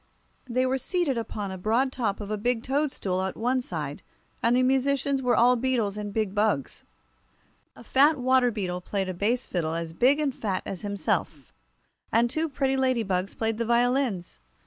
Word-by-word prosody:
They 255 +2 +1
were 260 +1 0
seated 345 -1 0
upon 210 -3 -4
the 190 - -6
broad 230 +7 +1
top 220 -7 -1
of 205 0 -6
a - - +1
big 240 +2 0
toadstool 265 -10 -1
at 190 0 -3
one 250 +3 +1
side, 150 - -5 0.4
and 235 +1 +3
the 255 - +3
musicians 270 +1 +1
were 250 -1 +2
all 245 +2 +5
beetles 235 -5 0
and 210 -1 -5
big 215 -2 -1
bugs. 205 -10 0 0.9
A - - -13
fat 285 +6 +4
water 255 -1 +3
beetle 185 -5 -3
played 190 0 -2
a - - -2
bass 225 +8 0
fiddle 165 -3 -2
as 165 -1 -4
big 260 - +3
and 290 -3 0
fat 200 -6 -3
as 190 - -5
himself, 190 - -2 0.6
and 235 +2 +3
two 315 +2 -1
pretty 270 -1 0
ladybugs 225 -8 0
played 225 0 -1
the 230 - 0
violins. 240 - +1
230 Hz, 180 wpm, -26 LUFS, 195-260 Hz, 0.9 s, all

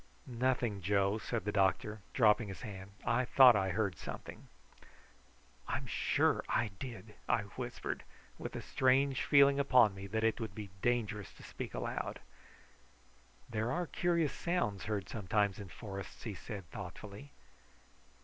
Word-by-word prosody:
"Nothing, 120 -4 0
Joe," 100 +2 +2
said 110 -3 -3
the 105 - 0
doctor, 105 +2 +1
dropping 110 -2 +4
his 95 +4 -8
hand. 95 -3 -7 0.2
"I 120 +2 +2
thought 125 -1 +8
I 95 -2 +1
heard 100 -1 0
something." - - -8 1.2
"I'm - - -2
sure - - +1
I 115 -2 +1
did," 115 -4 -7 0.2
I 105 - +3
whispered, 125 -1 -4 0.4
with - - -6
a - - -5
strange 130 +1 +2
feeling 140 -1 +6
upon 125 -6 +5
me 95 0 -7
that 110 +2 -1
it 115 +1 +2
would 110 -4 -5
be 105 -3 -7
dangerous 110 -4 0
to - - -14
speak - - -7
aloud. - - -3 1.3
"There 115 +1 -1
are 175 +5 0
curious 170 -2 +1
sounds 170 - -1
heard 105 -3 -2
sometimes 105 0 0
in 100 - -7
forests," 100 0 -8
he 110 - -4
said 100 -1 -7
thoughtfully. 100 +9 -8
110 Hz, 145 wpm, -34 LUFS, 100-125 Hz, 1.3 s, thought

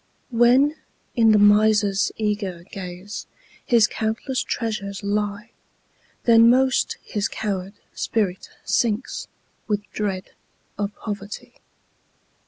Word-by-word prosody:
When, 250 +6 +4 0.4
in 225 -3 +5
the 215 - +6
miser's 205 -1 +4
eager 205 -5 -2
gaze, 185 +2 -7 0.4
His 235 -3 +5
countless 225 +5 -2
treasures 200 -4 -3
lie, 205 +2 -2 0.7
Then 230 -1 +7
most 260 +1 +3
his 210 0 -2
coward 195 -2 -4 0.2
spirit 195 -5 -1 0.2
sinks, 230 +1 0 0.4
With 210 -2 0
dread 195 -3 -3 0.4
of 205 0 -3
poverty. 205 -1 -7
210 Hz, 95 wpm, -23 LUFS, 200-230 Hz, 0.7 s, Then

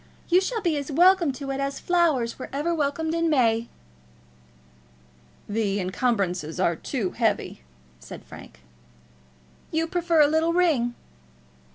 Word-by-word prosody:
You 360 +1 +5
shall 450 +3 -2
be 340 -5 0
as 285 +1 -5
welcome 350 0 +4
to 275 +1 -6
it 270 - -3
as 275 0 -3
flowers 315 -11 +1
were - - -7
ever 295 +5 -1
welcomed 320 +1 -1
in 335 0 +1
May." 235 -5 +2 1.8
"The 205 -1 -1
encumbrances 185 - -1
are 170 -2 +2
too 205 - -3
heavy," - - -1 0.4
said 60 - -11
Frank. 60 - -13 1.1
"You 320 0 0
prefer 335 -1 +1
a 290 - +6
little 320 +2 +1
ring." 295 -10 +2
280 Hz, 135 wpm, -25 LUFS, 230-335 Hz, 1.8 s, a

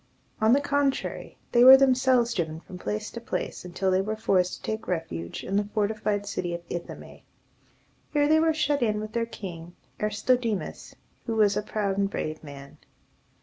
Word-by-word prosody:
On 220 +1 +4
the 280 - +4
contrary, 285 -1 -1
they 240 0 +5
were 260 +1 +11
themselves 255 -3 +3
driven 160 -4 -2
from 180 +1 -11
place 210 +3 -4
to 235 - -7
place, 240 - -4
until 185 +2 -1
they 185 +1 +3
were 215 +2 -3
forced 185 -4 +1
to - - -16
take 220 0 -5
refuge 85 - -4
in 195 - -3
the 205 0 -1
fortified 210 -1 0
city 175 -3 -3
of 170 - -7
I 175 - -1
tho´me. - - -12 0.9
Here 290 -1 +2
they 315 +1 +5
were 325 0 +3
shut 295 -2 0
in 215 -3 +1
with 215 0 -6
their 230 -1 -1
king, 175 -6 -8 0.2
Aristodemus, 215 0 -1 0.3
who 225 - -1
was 210 -2 +3
a 210 - 0
proud 200 -2 -2
and 200 0 +1
brave 155 -5 -4
man. 140 -2 -11
210 Hz, 185 wpm, -26 LUFS, 185-240 Hz, 0.9 s, were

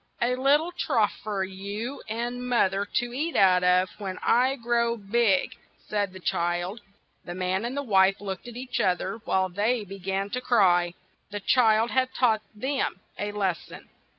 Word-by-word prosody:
"A 245 +1 +1
lit 275 +3 +4
tle 325 +3 -5
trough 240 -11 +1
for 205 -2 -2
you 200 +7 -5
and 240 +2 -3
moth 215 -6 +3
er 200 +1 -2
to 240 0 -1
eat 310 +6 -2
out 180 -2 +5
of 180 +1 +4
when 190 -2 -5
I 255 +3 +3
grow 235 -1 0
big," 205 -1 +1 0.2
said 205 -2 -2
the 185 - -10
child. 175 +4 -1 0.4
The 175 - -7
man 185 +2 -1
and 255 +4 -4
wife 195 -1 +4
looked 195 +1 -6
at 240 -1 -8
each 255 0 -4
oth 180 -1 +2
er 190 - -3
a 230 - -9
while 190 -3 +1
and 180 -1 -9
then 220 +3 +1
be 195 0 -9
gan 195 +2 -2
to 250 - -2
cry. 175 -8 +3 0.3
The 205 - -5
child 225 0 +3
had 260 0 +1
taught 225 -4 +3
them 265 -3 -2 0.2
a 205 0 -2
les 195 -4 -1
son. - - -13
210 Hz, 190 wpm, -26 LUFS, 190-240 Hz, 0.4 s, out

